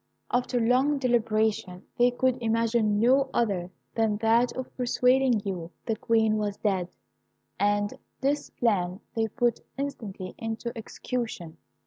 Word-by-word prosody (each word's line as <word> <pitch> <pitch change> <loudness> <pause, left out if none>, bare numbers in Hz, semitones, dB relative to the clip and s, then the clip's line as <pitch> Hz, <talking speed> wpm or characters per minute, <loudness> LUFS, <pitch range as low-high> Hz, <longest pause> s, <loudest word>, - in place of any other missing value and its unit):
"After 245 0 +1
long 255 +5 +3
deliberation, 220 -7 0
they 245 +1 +5
could 255 0 0
imagine 225 -2 +2
no 265 +4 +4
other 195 -7 0 0.2
than 220 -2 +1
that 230 +3 +3
of 260 - -6
persuading 250 -2 +3
you 180 -4 -4 0.2
the 225 - 0
Queen 220 -1 +2
was 205 -1 -2
dead, 190 -4 0 0.7
and 205 0 +1 0.3
this 285 +2 0
plan 190 -5 0 0.2
they 225 -1 +1
put 240 +1 0 0.2
instantly 215 -10 -5
into 225 +1 -4
execution. 220 -7 -5
225 Hz, 125 wpm, -27 LUFS, 205-245 Hz, 0.7 s, they